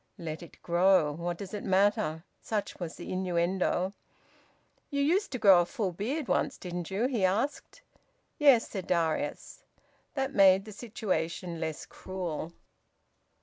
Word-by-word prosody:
`Let 160 -1 -5
it 170 - -13
grow! 175 -2 +4
What 170 +3 -4
does 195 +1 -8
it 210 - -4
matter?' 195 -4 +2 0.2
Such 210 -2 -3
was 170 -3 -5
the - - -8
innuendo. 185 +1 0 1.0
"You 280 - -2
used 370 +8 +1
to - - -1
grow 195 -6 +7
a - - 0
full 215 -7 -2
beard 245 - -3
once, - - 0
didn't 175 -2 -5
you?" 200 +5 0
he 245 -6 0
asked. 230 - -1 0.6
"Yes," 275 -6 +6
said 190 -3 -6
Darius. 160 -4 -1 0.5
That 270 -1 -1
made 195 0 +6
the 215 - -9
situation 180 -6 -3
less 160 -1 -4
cruel. 175 -4 -5
190 Hz, 145 wpm, -29 LUFS, 170-215 Hz, 1.0 s, grow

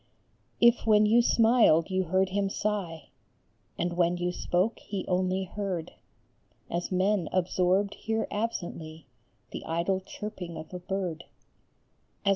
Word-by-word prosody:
If 235 -1 +4
when 210 -1 +6
you 225 +3 +5
smiled 225 -9 +4
you 185 0 +1
heard 185 +3 +2
him 195 +1 0
sigh, 195 -6 -3 0.7
And 175 0 -1
when 175 0 +2
you 175 0 -1
spoke 180 +5 0
he 200 -3 -5
only 185 +1 +1
heard 190 -3 -4 0.8
As 175 +2 -2
men 185 -1 +1
absorbed 185 +2 +1
hear 220 0 -2
absently 170 -8 -4 0.5
The - - -6
idle 170 +4 0
chirping 190 -3 -7
of 160 - -9
a 180 - -4
bird, 180 -3 -3
BEREA - - -25
VED. - - +4
185 Hz, 135 wpm, -28 LUFS, 175-205 Hz, 0.8 s, when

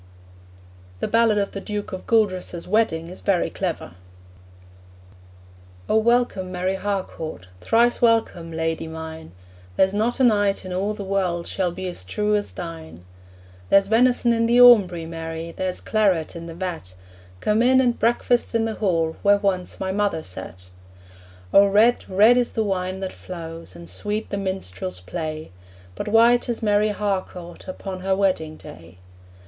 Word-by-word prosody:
The - - -1
ballad 230 -2 +3
of 200 -1 0
the 195 - -6
Duke 210 0 -5
of 185 - -7
Gueldres's 185 -6 0
wedding 180 -6 +1
is 180 - -9
very 195 -4 +1
clever: 180 - -4 2.0
'O - - +1
welcome, 220 -5 +1
Mary 185 +1 -1
Harcourt, 190 - -4
Thrice 235 - +2
welcome, 225 -8 +1
lady 160 0 -2
mine; 160 - -8 0.4
There's 190 - +3
not 220 +5 0
a - - +3
knight 205 -5 +2
in 185 - -5
all 200 +3 -1
the 205 - -6
world 185 -3 -1
Shall 185 -2 -1
be 185 +2 -7
as 175 - -6
true 210 - 0
as 205 -1 -1
thine. 160 - -9 0.6
'There's 195 0 +5
venison 240 +2 +3
in 230 0 +1
the 240 +1 +4
aumbry, 200 -9 +6
Mary, 165 0 -6
There's 185 +1 -3
claret 190 -7 +1
in 170 0 -7
the 165 - -8
vat; 170 - -5 0.4
Come 210 - +1
in, 260 +2 +5
and 245 -2 +1
breakfast 240 +1 +1
in 225 0 +2
the 225 - -2
hall 165 -7 0
Where 205 0 +5
once 190 -3 -2
my 190 0 -2
mother 200 -5 -1
sat!' 90 0 -9 0.8
O 200 0 +7
red, 215 +5 +3
red 215 +6 +5
is 245 -1 0
the 220 - 0
wine 190 -1 -2
that 190 - -4
flows, 165 - -9
And 85 0 -11
sweet 205 - -3
the 200 - -2
minstrel's 95 - -4
play, 155 - -6 0.4
But 205 - -6
white 235 +3 +4
is 235 -1 -3
Mary 210 0 +3
Harcourt 190 -4 -4
Upon 185 0 -6
her 190 +1 0
wedding 180 -6 0
day. 85 +2 -13
190 Hz, 160 wpm, -23 LUFS, 165-215 Hz, 2.0 s, O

